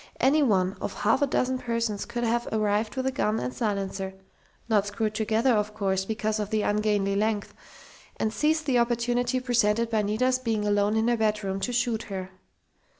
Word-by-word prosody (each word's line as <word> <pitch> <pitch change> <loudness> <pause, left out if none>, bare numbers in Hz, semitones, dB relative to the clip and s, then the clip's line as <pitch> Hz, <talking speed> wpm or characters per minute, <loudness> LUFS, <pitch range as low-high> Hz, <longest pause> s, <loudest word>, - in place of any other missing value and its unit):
Any 290 +4 +4
one 190 -7 +2
of - - -4
half - - +2
a 285 - +3
dozen 260 -1 0
persons 230 -4 -2
could 240 0 -4
have 235 +1 0
arrived 215 +1 0
with 260 0 -2
the 265 - +1
gun 220 -4 0
and 125 0 -3
silencer 195 - -3 0.5
not 210 -3 +2
screwed 210 +1 -2
together, 220 +4 +2
of 210 -1 0
course, 190 -2 0
because 215 0 -1
of 210 -1 -2
the 215 -1 0
ungainly 205 -1 +1
length 210 0 -1 0.6
and 220 0 -1
seized 315 +3 +1
the 255 -4 +2
opportunity 240 +1 +1
presented 235 -2 +1
by 220 -1 +2
Nita's 250 +5 +1
being 225 -4 -1
alone 205 +1 +2
in 220 +1 +2
her 240 -1 +2
bedroom 210 -3 0
to 245 - -2
shoot 240 -2 0
her. 190 -1 -5
220 Hz, 185 wpm, -26 LUFS, 205-240 Hz, 0.6 s, Any